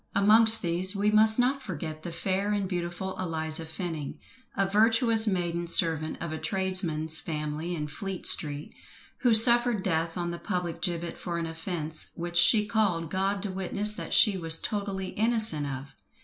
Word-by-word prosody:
Amongst 220 +3 +7
these 180 +3 -1
we 205 +1 0
must 220 +1 +4
not 260 +3 0
forget 155 - -8
the 175 - -8
fair 195 +4 -3
and 200 -2 -3
beautiful 180 +1 -6
Eliza 160 -2 -3
Fenning, 160 -3 -7 0.4
a 195 -1 0
virtuous 225 +2 +2
maiden 175 -3 -3
servant 160 -2 +2
of 170 -2 -6
a 160 - -6
tradesman's 160 -2 -1
family 155 +2 -6
in 150 -2 -5
Fleet 190 +5 -7
Street, 145 -1 +5 0.5
who 245 - +1
suffered 235 -2 +5
death 165 -1 -3
on 175 -1 -4
the 170 - -8
public 175 -4 -5
gibbet 170 -2 -4
for 170 -2 -6
an 170 - -4
offence 165 -1 -5
which 175 0 -5
she 210 +5 +4
called 190 -7 -2
God 195 +1 -2
to 205 - -5
witness 195 +3 -1
that - - -8
she 210 -4 +3
was 165 -1 +1
totally 200 -2 -5
innocent 220 -10 +3
of! 135 0 -8
180 Hz, 165 wpm, -26 LUFS, 165-205 Hz, 0.5 s, Amongst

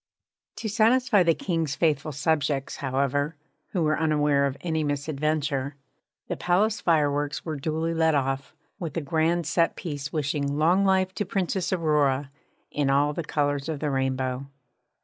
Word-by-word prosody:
To 225 - -4
satisfy 225 +1 +3
the 165 -2 +3
King's 165 -6 -1
faithful 155 -2 +1
subjects, 145 -1 0
however, 140 +2 0 0.3
who 180 -4 -1
were 155 0 +1
unaware 150 -3 +2
of 135 0 -5
any 160 -3 -1
misadventure 145 -1 -1 0.5
the - - -2
palace 205 +5 +1
fireworks 145 -3 +1
were 160 -2 -3
duly 160 +3 -2
let 160 -1 +3
off, 135 -1 -1 0.2
with 170 -2 -4
a - - 0
grand 160 +3 +1
set 165 +1 +1
piece 145 -4 -5
wishing 145 -1 -1
Long 175 +6 +4
Life 190 -1 +2
to 205 - -1
the - - -12
Princess 190 -2 -1
Aurora! 145 -6 +1 0.4
in 145 -2 0
all 145 +2 +3
the 170 - -3
colours 145 -1 -1
of 155 -3 -3
the 150 -1 -1
rainbow. 130 0 -1
150 Hz, 155 wpm, -26 LUFS, 140-165 Hz, 0.5 s, Long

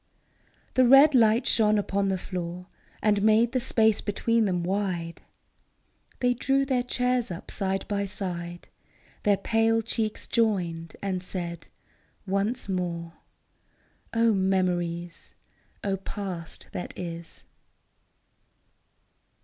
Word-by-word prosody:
The 255 -1 +4
red 275 +4 +8
light 230 -1 +4
shone 215 -1 +3
upon 200 -1 0
the 190 -1 0
floor 180 0 -5 0.4
And 205 -1 +3
made 220 +2 +4
the 255 - +1
space 220 -3 +2
between 230 +2 +1
them 180 -3 0
wide: 180 -3 -2 1.0
They 245 0 +3
drew 270 +2 +1
their 260 -2 +1
chairs 250 -1 0
up 175 0 -7
side 195 -1 -1
by 200 -1 -1
side, 175 -3 -5 0.5
Their 205 -1 +3
pale 225 +2 +2
cheeks 220 -1 -2
joined, 175 -8 0
and 190 -2 -1
said, 170 -2 -5 0.3
" - - -37 0.2
Once 200 +6 0
more! 170 -3 -3 0.5
" - - -39
O 225 - +4
memories! 175 -3 -1 0.5
O 195 -1 0
past 185 -4 -6
that 180 - -6
is 170 -1 -7
200 Hz, 115 wpm, -27 LUFS, 180-225 Hz, 1.0 s, red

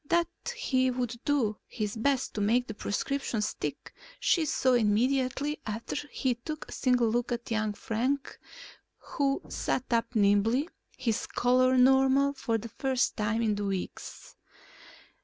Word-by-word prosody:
That 340 0 +3 0.3
he 260 -1 +1
would 245 -2 -3
do 240 -8 +1
his 210 -2 -3
best 265 +3 0
to 210 - -3
make 235 +5 +2
the 220 - -6
prescription 235 +4 -2
stick - - -4 0.3
she 330 -3 +2
saw 260 -3 +2
immediately 255 +6 +1
after 220 +2 -4
he 260 -1 0
took 305 +6 -7
a - - -12
single 250 -2 +2
look 240 +2 0
at 235 -1 -4
young 215 -1 0
Frank 255 +7 -2 0.6
who 280 +4 -1
sat 255 - -1
up 230 +1 0
nimbly, 215 +7 +3 0.3
his 235 -4 -1
color 255 +1 +3
normal 265 +2 +5
for 230 -4 -1
the 230 +2 -7
first 260 +2 0
time 225 +2 0
in 215 -2 +2
weeks. 200 -2 -5
245 Hz, 140 wpm, -29 LUFS, 220-265 Hz, 0.6 s, normal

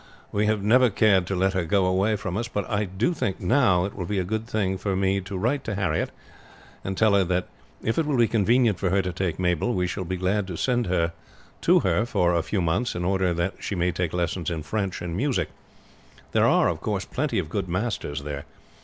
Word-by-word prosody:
We 105 +1 +1
have 105 -2 +1
never 125 +4 +5
cared 100 -3 +3
to 95 - -1
let 95 +1 +1
her 95 -2 0
go 95 +3 +2
away 95 +4 +2
from 90 -3 -4
us; 115 +3 -2
but 105 - -3
I 105 -1 0
do 95 - 0
think 125 - -2
now 100 -3 +3
that 100 - -2
it - - -18
will 90 -3 -4
be 105 - -1
a 95 - +1
good 110 +4 -3
thing 95 -5 -1
for 100 -2 -1
me 95 +1 +1
to 95 +1 -6
write 125 +8 0
to 110 - -2
Harriet, 95 -1 0 0.7
and 95 0 -4
tell 110 -2 +4
her 100 -1 +5
that 90 +1 -1 0.4
if 115 +8 0
it 160 - 0
will 145 -3 +1
be 120 -1 +5
convenient 115 -1 +2
for 95 - 0
her 95 +1 +2
to 90 -1 -3
take 90 -2 -2
Mabel, 90 +6 0
we 90 - +1
shall 95 +1 -3
be 90 +1 -3
glad 95 +2 0
to 90 -3 -5
send 120 +1 +1
her 85 -2 +1 0.5
to - - +4
her 115 - +1
for 90 -7 +2
a 85 - +2
few 95 +4 -2
months 100 +9 0
in 85 0 -2
order 95 -1 +1
that 85 +3 -1
she 100 - -4
may 90 0 +1
take 90 -1 -2
lessons 90 -1 -1
in 80 -3 -3
French 95 +1 -3
and 85 -1 -4
music. 130 +6 0 0.8
There - - +4
are, - - +4
of - - -2
course, 100 -3 -2
plenty 135 -4 -2
of 90 -5 -1
good 95 +2 -3
masters 90 - -2
there. 70 -1 -5
95 Hz, 240 wpm, -25 LUFS, 90-110 Hz, 0.8 s, never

